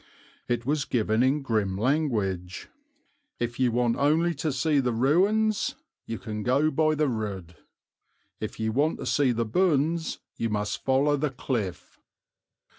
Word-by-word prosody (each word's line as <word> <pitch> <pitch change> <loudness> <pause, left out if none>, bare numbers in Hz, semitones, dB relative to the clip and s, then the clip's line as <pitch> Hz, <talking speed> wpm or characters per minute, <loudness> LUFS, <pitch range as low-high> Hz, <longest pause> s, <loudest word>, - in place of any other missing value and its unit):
It 120 -1 -1
was 145 +1 0
given 110 -1 +1
in 135 +3 +2
grim 105 -6 0
language. 105 - -1 0.7
"If 120 +1 -3
you 125 -2 +3
want 120 0 +1
only 160 +5 +2
to 155 +1 -2
see 140 +3 +1
the 125 -2 +1
ruins 200 - +2 0.3
you 115 - -3
can 105 -2 -5
go 140 +7 +2
by 155 +1 +2
the 150 0 +1
road; 100 -8 -4 0.8
if 110 +1 -6
you 110 0 0
want 145 +7 +1
to - - -6
see 140 -4 +2
the 115 -1 -1
bones 160 - +1 0.2
you 115 - -1
must 105 -1 -2
follow 140 +2 +2
the 150 +1 0
cliff." 120 -7 -4
130 Hz, 150 wpm, -26 LUFS, 110-150 Hz, 0.8 s, you